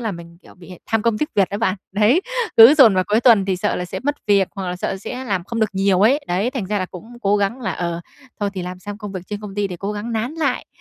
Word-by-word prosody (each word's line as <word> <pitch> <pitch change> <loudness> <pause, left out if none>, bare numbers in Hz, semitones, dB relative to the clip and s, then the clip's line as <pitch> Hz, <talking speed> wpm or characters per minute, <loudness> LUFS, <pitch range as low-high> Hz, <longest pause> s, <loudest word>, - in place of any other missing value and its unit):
là 220 -4 -2
mình, 170 0 -11
kiểu, - - -17
bị 180 0 -13
tham 225 -1 0
công 230 -2 +1
tiếc 300 - -1
việc 195 -3 +3
đó 200 - -3
bạn. 205 -3 0 0.2
Đấy, 215 - +3 0.4
cứ 230 +6 +10
dồn 250 -9 +7
vào 185 0 +2
cuối 215 +2 +2
tuần 230 -6 +5
thì 190 -1 -1
sợ - - -1
là 180 - -3
sẽ - - -6
mất 290 +2 -1
việc, 200 -2 +3
hoặc 190 -2 -4
là 180 - -3
sợ 190 - -3
sẽ 250 +6 -7
làm 195 -6 -2
không 230 +3 -4
được 215 - +1
nhiều 195 -1 +2
ấy. 260 +9 +4
Đấy, 190 +7 0
thành 255 -7 -4
ra 205 +1 -1
là 185 - -2
cũng 180 +3 -11 0.2
cố 200 +1 +3
gắng 205 +6 -1
là, - - -2
ờ, 170 -1 -3 0.4
thôi 205 - 0
thì 185 - -4
làm 180 0 -6
xong 205 +2 -8
công 210 -2 -7
việc 185 - -5
trên 205 0 -5
công 205 -2 -8
ty 205 -1 0
để 180 - -6
cố 200 +4 -4
gắng 210 +3 -5
nán 230 +6 -2
lại, 285 -6 -1
205 Hz, 300 wpm, -20 LUFS, 185-230 Hz, 0.4 s, cứ